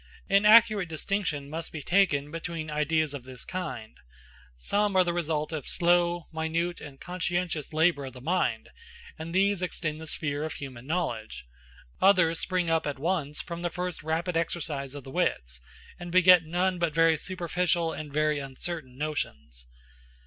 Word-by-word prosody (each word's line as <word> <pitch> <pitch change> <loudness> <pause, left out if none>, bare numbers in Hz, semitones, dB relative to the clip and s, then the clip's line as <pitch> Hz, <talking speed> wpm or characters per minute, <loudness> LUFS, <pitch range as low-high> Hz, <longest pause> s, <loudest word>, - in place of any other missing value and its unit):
An 200 +1 +4
accurate 215 -4 +6
distinction 160 -3 -2
must 160 +3 -5
be 155 -3 -6
taken 155 -6 +2
between 165 -1 -5
ideas 150 0 +1
of 140 -4 -6
this 130 -1 -10
kind. 165 -12 -5 0.6
Some 205 - 0
are 185 - +6
the 175 -1 -1
result 160 -3 -1
of 155 -4 -5
slow, 175 -1 +2
minute, 165 +2 -1
and 140 -2 -10
conscientious 175 -3 -2
labor 160 -2 +2
of 130 - -8
the 130 - -10
mind, 170 +8 0 0.5
and 160 +1 -6
these 195 +1 +2
extend 160 -3 -3
the 160 - -8
sphere 145 -1 -3
of 155 - -3
human 130 -3 -8
knowledge; 115 - -3 0.6
others 180 -4 +5
spring 180 -2 -1
up 165 -1 +1
at 145 - -3
once 150 -1 -1
from 170 0 -6
the 175 - -1
first 180 0 -4
rapid 165 +3 -1
exercise 150 -5 -2
of 145 - -7
the 135 - -10
wits, 60 - -1 0.4
and 175 0 -7
beget 180 -1 +7
none 180 +2 0
but 170 -3 0
very 165 0 +5
superficial 175 0 -1
and 150 -2 -7
very 150 0 +1
uncertain 135 0 -6
notions. 75 - -4
160 Hz, 165 wpm, -28 LUFS, 145-175 Hz, 0.6 s, beget